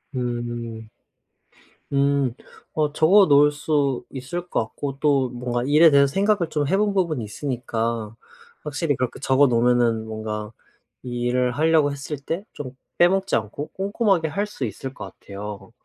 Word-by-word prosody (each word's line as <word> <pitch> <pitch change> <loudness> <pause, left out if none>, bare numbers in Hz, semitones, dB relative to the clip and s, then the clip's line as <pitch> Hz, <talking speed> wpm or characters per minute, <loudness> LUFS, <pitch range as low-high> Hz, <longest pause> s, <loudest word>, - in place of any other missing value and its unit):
음. 120 -2 -4 1.0
음. 140 -2 +2 0.4
어 150 -2 0
적어 185 +7 +5
놓을 145 0 +6
수 145 -3 0
있을 170 +7 -6
것 - - 0
같고 135 +5 -5
또 140 -4 +2
뭔가 120 0 -3
일에 155 +3 +6
대해서 140 0 +6
생각을 200 -4 +2
좀 145 -3 -1
해 190 - +2
본 205 -1 +1
부분이 165 - 0
있으니까 115 -2 -3 0.5
확실히 145 0 -1
그렇게 125 0 -3
적어 135 +1 +4
놓으면은 120 -2 +2
뭔가 110 -1 -5 0.5
이 120 -1 -4
일을 125 +1 +1
하려고 155 -2 +3
했을 140 +1 -5
때 165 +7 -4 0.2
좀 130 -2 -6 0.2
빼먹지 190 0 +3
않고 115 +7 -5
꼼꼼하게 195 -3 0
할 200 +7 -2
수 140 -11 -4
있을 130 +5 -6
것 105 - -8
같아요. 105 +2 -8
140 Hz, 285 characters per minute, -23 LUFS, 120-155 Hz, 1.0 s, 놓을